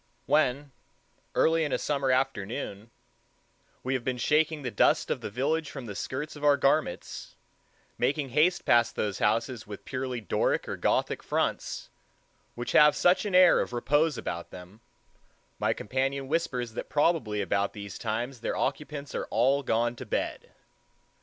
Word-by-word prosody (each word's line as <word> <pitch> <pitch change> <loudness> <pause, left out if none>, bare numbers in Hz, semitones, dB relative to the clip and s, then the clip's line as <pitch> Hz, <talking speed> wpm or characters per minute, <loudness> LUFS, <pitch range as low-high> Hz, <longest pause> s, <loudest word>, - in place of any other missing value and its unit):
When, 140 -1 +1 0.6
early 165 0 +3
in 150 - -2
a - - +2
summer 140 -2 -1
afternoon, 120 -4 -1 0.9
we 130 - -1
have 130 -2 -1
been 130 0 -2
shaking 150 +3 +1
the 125 - -3
dust 100 - +2
of - - -2
the - - -4
village 145 +7 -1
from 135 -4 -7
the 105 - -6
skirts 135 +9 -4
of 150 - -10
our 145 -1 +5
garments, 140 - -1 0.6
making 145 -1 0
haste 155 +7 +2
past 120 -1 +3
those 105 -3 -2
houses 115 +1 0
with 105 -1 -9
purely 130 -2 -3
Doric 105 - 0
or - - -3
Gothic - - 0
fronts, - - -2 0.6
which 120 0 -4
have 150 0 +6
such 180 +4 +3
an 200 -3 -1
air 180 -1 +7
of - - -2
repose 145 +6 +2
about 85 0 -5
them, 90 +5 -12 0.8
my - - +2
companion 135 +4 -2
whispers 130 -7 -1
that - - -6
probably 145 -8 +1
about 100 +1 0
these 100 -3 -8
times 120 +3 -3
their - - -2
occupants 145 -1 -3
are - - -2
all 135 +5 +2
gone 120 -1 0
to - - -7
bed. - - -3
130 Hz, 160 wpm, -28 LUFS, 115-150 Hz, 0.9 s, air